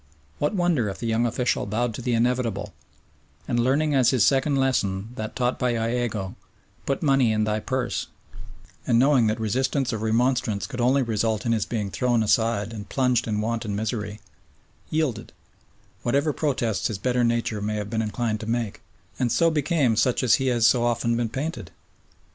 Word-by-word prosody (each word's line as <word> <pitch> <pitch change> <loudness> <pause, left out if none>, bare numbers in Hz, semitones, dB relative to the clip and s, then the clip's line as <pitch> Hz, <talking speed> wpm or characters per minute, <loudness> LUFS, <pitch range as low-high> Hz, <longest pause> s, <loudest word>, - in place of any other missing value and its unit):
What 150 +8 0
wonder 170 - +1
if 95 - -6
the - - -6
young 115 +1 +1
official 120 -2 -1
bowed 115 +3 -1
to 125 - -6
the 120 0 0
inevitable, 115 -4 0 0.7
and 120 - 0
learning 140 +5 +2
as 130 -4 +4
his 125 -6 +3
second 140 +1 +2
lesson 110 -7 0
that 110 -4 -6
taught 125 0 0
by 125 -1 +1
Iago, 115 -4 -2 0.5
"Put 140 +3 -1
money 135 -5 +3
in 110 0 +1
thy 105 0 0
purse," 125 - -2 0.8
and 115 - +3
knowing 130 -2 +4
that 110 +1 -1
resistance 130 +4 0
or 110 - -2
remonstrance 110 -1 +1
could 125 -3 -5
only 130 +3 +3
result 110 -2 -1
in 115 - +1
his 110 -3 0
being 105 -4 -3
thrown 120 0 +1
aside 110 0 +1
and 105 -3 -8
plunged 125 -3 +1
in 105 -1 -1
want 115 +1 -2
and 105 -3 -3
misery, 105 -1 -3 0.7
yielded, 145 -9 -2 0.7
whatever 140 +5 +1
protests 125 -9 -1
his 110 - -4
better 125 +4 0
nature 115 -2 0
may 105 +1 -2
have 105 -1 -4
been 110 -1 0
inclined 110 0 -2
to 110 - -7
make, 115 -3 -2 0.4
and 125 -2 +1
so 165 +6 +3
became 150 -5 +1
such 120 +4 +1
as 120 -5 +4
he 135 - 0
has 120 -3 +2
so 120 +1 +4
often 115 0 +1
been 115 -1 -1
painted? 135 - -4
120 Hz, 185 wpm, -24 LUFS, 110-130 Hz, 0.8 s, as